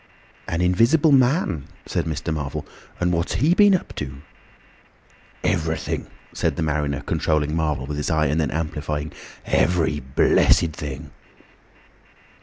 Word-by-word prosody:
"An 85 Hz, +1 st, -1 dB
Invisible 115 Hz, -, +4 dB
Man!" 125 Hz, -, +2 dB, 0.2 s
said -, -, -2 dB
Mr. 80 Hz, 0 st, -3 dB
Marvel. 70 Hz, -3 st, -4 dB, 0.3 s
"And 90 Hz, 0 st, +1 dB
what's 85 Hz, +1 st, -1 dB
he 150 Hz, +7 st, +3 dB
been 205 Hz, 0 st, +6 dB
up 180 Hz, -, -4 dB
to?" 70 Hz, -1 st, -6 dB, 1.2 s
"Everything," -, -, -1 dB, 0.3 s
said -, -, 0 dB
the -, -, -2 dB
mariner, 75 Hz, -2 st, -1 dB
controlling 75 Hz, 0 st, 0 dB
Marvel 75 Hz, -5 st, -1 dB
with 75 Hz, +1 st, -5 dB
his 75 Hz, -, -2 dB
eye, 80 Hz, -1 st, +2 dB
and 75 Hz, +3 st, +1 dB
then 75 Hz, -, 0 dB
amplifying, 75 Hz, -1 st, -3 dB, 0.3 s
"every—blessed—thing." 75 Hz, -1 st, +1 dB
80 Hz, 120 wpm, -23 LUFS, 75-90 Hz, 1.2 s, been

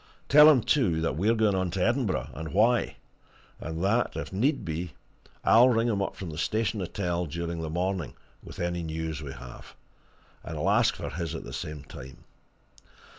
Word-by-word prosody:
Tell 150 Hz, +2 st, +9 dB
him, 140 Hz, -5 st, +5 dB
too, 105 Hz, -, +2 dB
that 80 Hz, -5 st, -1 dB
we're 105 Hz, +8 st, +2 dB
going 110 Hz, -2 st, +2 dB
on 95 Hz, -1 st, 0 dB
to 90 Hz, +1 st, 0 dB
Edinburgh, 105 Hz, -, 0 dB
and 80 Hz, +2 st, -7 dB
why, 115 Hz, +5 st, +2 dB, 0.6 s
and 80 Hz, +2 st, -5 dB
that, 115 Hz, +5 st, +1 dB
if -, -, -5 dB
need 125 Hz, +3 st, +1 dB
be, 80 Hz, +1 st, -4 dB, 0.5 s
I'll 120 Hz, +3 st, +6 dB
ring 115 Hz, -1 st, +2 dB
him 100 Hz, -3 st, 0 dB
up -, -, -3 dB
from 90 Hz, -4 st, -6 dB
the 75 Hz, -, -6 dB
Station 110 Hz, +2 st, 0 dB
Hotel 90 Hz, -1 st, -2 dB
during 85 Hz, +2 st, -4 dB
the 80 Hz, -, -4 dB
morning 90 Hz, -3 st, -2 dB, 0.3 s
with -, -, -11 dB
any 85 Hz, 0 st, -2 dB
news 80 Hz, -1 st, -4 dB
we 70 Hz, -3 st, -7 dB
have, 60 Hz, 0 st, -12 dB, 0.7 s
and 80 Hz, -, -6 dB
I'll 90 Hz, +7 st, +1 dB
ask 115 Hz, +2 st, +3 dB
for -, -, -6 dB
his 85 Hz, 0 st, -4 dB
at -, -, -6 dB
the -, -, -9 dB
same 75 Hz, -2 st, -6 dB
time. 65 Hz, -1 st, -12 dB
90 Hz, 185 wpm, -27 LUFS, 80-110 Hz, 0.7 s, Tell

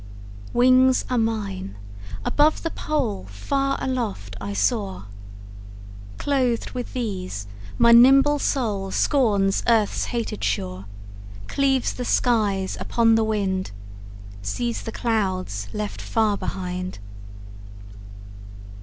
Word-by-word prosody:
Wings 255 Hz, +1 st, +4 dB
are 250 Hz, -, +2 dB
mine; 200 Hz, -, -3 dB, 0.5 s
above 300 Hz, +1 st, +2 dB
the 330 Hz, -, -2 dB
pole 250 Hz, -, -2 dB
Far 275 Hz, -, -1 dB
aloft 215 Hz, -, -3 dB
I 100 Hz, 0 st, -4 dB
soar. 100 Hz, -1 st, -1 dB, 1.1 s
Clothed 255 Hz, -5 st, 0 dB
with 250 Hz, -2 st, -6 dB
these, 185 Hz, -, -4 dB, 0.3 s
my 235 Hz, 0 st, +6 dB
nimble 270 Hz, +5 st, +7 dB
soul 210 Hz, -9 st, -1 dB
Scorns 200 Hz, -5 st, +2 dB
earth's 225 Hz, -3 st, +2 dB
hated 230 Hz, -3 st, -4 dB
shore, 95 Hz, +1 st, -2 dB, 0.6 s
Cleaves 270 Hz, -2 st, +1 dB
the 250 Hz, -, -5 dB
skies 205 Hz, -7 st, +1 dB
upon 230 Hz, -1 st, +2 dB
the 225 Hz, 0 st, +3 dB
wind, 195 Hz, -4 st, -1 dB, 0.7 s
Sees 235 Hz, -, -2 dB
the 225 Hz, -, -6 dB
clouds 185 Hz, -, -2 dB
left 210 Hz, -1 st, -4 dB
far 220 Hz, -2 st, +1 dB
behind. 180 Hz, -1 st, -4 dB
220 Hz, 100 wpm, -23 LUFS, 185-250 Hz, 1.1 s, nimble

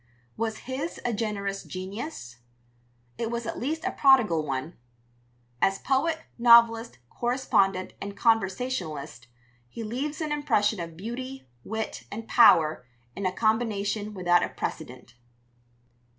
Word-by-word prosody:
Was 220 Hz, -1 st, -2 dB
his 265 Hz, +6 st, -4 dB
a 240 Hz, -, +1 dB
generous 200 Hz, -2 st, -2 dB
genius? 185 Hz, -, -7 dB, 0.8 s
It 230 Hz, -1 st, -1 dB
was 235 Hz, 0 st, -3 dB
at 225 Hz, -, -4 dB
least 315 Hz, +6 st, -3 dB
a -, -, 0 dB
prodigal 240 Hz, -, +4 dB
one. 140 Hz, +3 st, -4 dB, 0.9 s
As 195 Hz, 0 st, +3 dB
poet, 320 Hz, +5 st, 0 dB, 0.2 s
novelist, 235 Hz, -1 st, +6 dB
correspondent, 200 Hz, -7 st, +1 dB
and 200 Hz, 0 st, -6 dB
conversationalist, 185 Hz, -, -1 dB, 0.4 s
he 230 Hz, -, -7 dB
leaves 265 Hz, +7 st, -3 dB
an 310 Hz, -2 st, -3 dB
impression 225 Hz, -9 st, +1 dB
of 165 Hz, -1 st, -6 dB
beauty, 255 Hz, -, -6 dB, 0.2 s
wit, 220 Hz, 0 st, -4 dB
and 225 Hz, +2 st, -6 dB
power 160 Hz, -, +5 dB, 0.3 s
in 195 Hz, -1 st, -1 dB
a -, -, 0 dB
combination 215 Hz, -1 st, 0 dB
without 175 Hz, -1 st, +3 dB
a -, -, -1 dB
precedent. 125 Hz, -1 st, -6 dB
220 Hz, 120 wpm, -27 LUFS, 185-245 Hz, 0.9 s, novelist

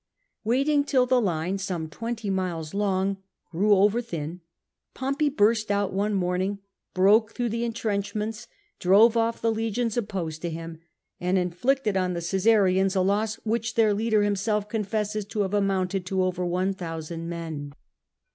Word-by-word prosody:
Waiting 275 Hz, +6 st, +2 dB
till 260 Hz, -3 st, +2 dB
the 250 Hz, 0 st, +3 dB
line— 180 Hz, -1 st, -1 dB
some 180 Hz, -4 st, -3 dB
twenty 225 Hz, +5 st, -4 dB
miles 175 Hz, -5 st, -2 dB
long 195 Hz, -1 st, 0 dB, 0.2 s
— -, -, -51 dB
grew 205 Hz, +5 st, +4 dB
over 205 Hz, +4 st, +3 dB
thin, 170 Hz, -5 st, -6 dB, 0.5 s
Pompey 275 Hz, +3 st, 0 dB
burst 220 Hz, -4 st, +2 dB
out 200 Hz, -1 st, 0 dB
one 205 Hz, +2 st, 0 dB
morning, 185 Hz, +2 st, 0 dB, 0.4 s
broke 210 Hz, +4 st, +4 dB
through 240 Hz, -1 st, -1 dB
the 230 Hz, +2 st, -2 dB
entrenchments, 215 Hz, 0 st, -3 dB, 0.3 s
drove 210 Hz, +6 st, +5 dB
off 230 Hz, 0 st, 0 dB
the 230 Hz, -, +3 dB
legions 225 Hz, +1 st, -1 dB
opposed 185 Hz, -8 st, -3 dB
to 175 Hz, -, -2 dB
him, 165 Hz, 0 st, -7 dB, 0.4 s
and 180 Hz, +2 st, +1 dB
indicted 210 Hz, +6 st, 0 dB
on 185 Hz, -1 st, +1 dB
the 170 Hz, -, -2 dB
Oajsarians 190 Hz, +1 st, +2 dB
a 190 Hz, -, +3 dB
loss 210 Hz, +3 st, +1 dB
which 225 Hz, +1 st, -1 dB
their 220 Hz, -2 st, +4 dB
leader 215 Hz, 0 st, +2 dB
himself 205 Hz, +1 st, 0 dB
confesses 210 Hz, 0 st, -2 dB
to 210 Hz, +1 st, -2 dB
have 195 Hz, 0 st, -1 dB
amounted 195 Hz, -2 st, 0 dB
to 190 Hz, 0 st, +1 dB
over 180 Hz, -1 st, -1 dB
1000 170 Hz, -2 st, -3 dB
men. 160 Hz, -4 st, -5 dB
200 Hz, 155 wpm, -26 LUFS, 180-225 Hz, 0.5 s, drove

